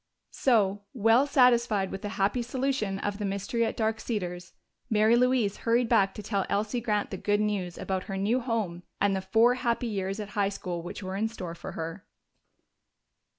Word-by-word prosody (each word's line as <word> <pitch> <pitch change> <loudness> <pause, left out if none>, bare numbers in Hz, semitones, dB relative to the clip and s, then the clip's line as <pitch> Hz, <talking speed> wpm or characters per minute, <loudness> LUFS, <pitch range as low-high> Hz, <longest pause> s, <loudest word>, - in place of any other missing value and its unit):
So, 205 -6 +2
well 230 +4 +4
satisfied 235 -7 +3
with 195 - -5
the 205 - -4
happy 205 +5 +1
solution 245 -5 -1
of 205 +1 -3
the - - -3
mystery 200 +4 -1
at - - -3
Dark 220 -1 0
Cedars, 180 -6 -4 0.4
Mary 220 +1 +4
Louise 245 -4 +2
hurried 235 +1 +2
back 195 -5 +3
to 210 - -7
tell 200 -2 0
Elsie 215 +4 0
Grant 210 -3 -1
the 190 - -3
good 205 +2 +1
news 200 -5 -1
about 190 -1 -3
her 195 -2 -4
new 215 +6 +1
home 220 -8 -2 0.2
and 200 -1 +2
the 190 - -1
four 225 +6 +4
happy 245 -1 -1
years 195 -2 -2
at 210 -2 -5
high 205 -1 +1
school 180 -3 -5
which 175 +4 -7
were 185 0 -4
in 215 +3 0
store 185 -7 -6
for 180 +2 -8
her. 165 +3 -5
210 Hz, 190 wpm, -28 LUFS, 195-235 Hz, 0.4 s, well